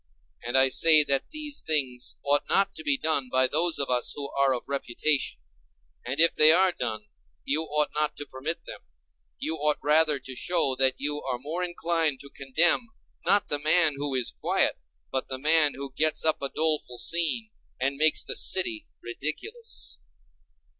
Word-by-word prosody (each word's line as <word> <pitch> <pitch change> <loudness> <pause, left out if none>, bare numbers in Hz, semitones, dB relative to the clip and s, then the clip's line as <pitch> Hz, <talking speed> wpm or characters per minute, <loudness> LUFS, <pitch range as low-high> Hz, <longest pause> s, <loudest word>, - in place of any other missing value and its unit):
And 120 +2 0
I 130 0 +5
say 155 +2 +6
that 140 -2 0
these 300 -2 -3
things 130 -5 -2
ought 145 +1 +1
not 195 0 +2
to 160 - -9
be 145 -2 +1
done 140 -4 -1
by 130 +1 +3
those 160 +5 +1
of 140 -2 -2
us 125 -1 0
who 140 -1 -5
are 140 -1 +1
of 125 -2 -2
reputation; 140 +1 -1 0.7
and 135 +4 -5
if 165 +1 +4
they 155 +1 +7
are 185 +3 +3
done, 110 -9 -5 0.4
you 155 +3 -1
ought 150 -1 -1
not 150 0 -1
to 145 - -6
permit 140 +5 -6
them; - - -10 0.6
you 160 +1 -3
ought 150 0 0
rather 150 0 +5
to 130 0 -8
show 165 -3 0
that 130 0 +4
you 145 +1 -3
are 130 -2 -4
more 155 +8 -4
inclined 165 -5 -1
to 140 - -11
condemn, 165 - 0 0.4
not 205 0 +2
the 145 - -1
man 155 +1 +3
who 140 -1 -3
is 125 -2 0
quiet, - - -1 0.3
but 130 - -3
the 130 - -4
man 150 +1 +3
who 140 -1 -8
gets 155 +2 +2
up 155 - +2
a 140 - -2
doleful 155 -6 -1
scene, 170 - +1 0.3
and 135 +2 -1
makes 155 +2 +2
the - - -3
city 345 -4 +2 0.2
ridiculous. 430 - -6
150 Hz, 180 wpm, -26 LUFS, 135-165 Hz, 0.7 s, they